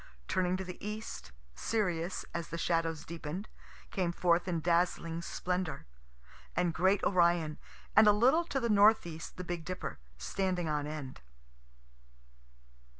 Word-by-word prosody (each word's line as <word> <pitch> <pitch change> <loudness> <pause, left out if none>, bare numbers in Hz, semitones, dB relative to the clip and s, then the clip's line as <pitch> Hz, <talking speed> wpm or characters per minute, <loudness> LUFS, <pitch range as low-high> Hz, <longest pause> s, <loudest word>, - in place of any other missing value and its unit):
Turning 185 0 +1
to 190 - -4
the 180 -1 -9
east, 210 - -6 0.2
Sirius, 180 - -1
as 170 -1 -3
the 165 - -5
shadows 165 -1 0
deepen'd, 170 +3 -5 0.4
came 180 -3 0
forth 175 0 +2
in 170 -2 0
dazzling 170 0 +1
splendor. 180 0 -3 0.7
And 175 -1 +1
great 190 +4 +3
Orion; 170 -4 +3 0.4
and 215 0 +8
a - - +9
little 260 +11 +4
to 275 - -1
the 235 - 0
north 210 -1 +6
east 165 -2 -7
the 180 - -4
big 175 -2 -4
Dipper, 180 - -5 0.2
standing 180 - -1
on 150 -1 -1
end. 150 -4 -6
175 Hz, 140 wpm, -32 LUFS, 165-190 Hz, 0.7 s, a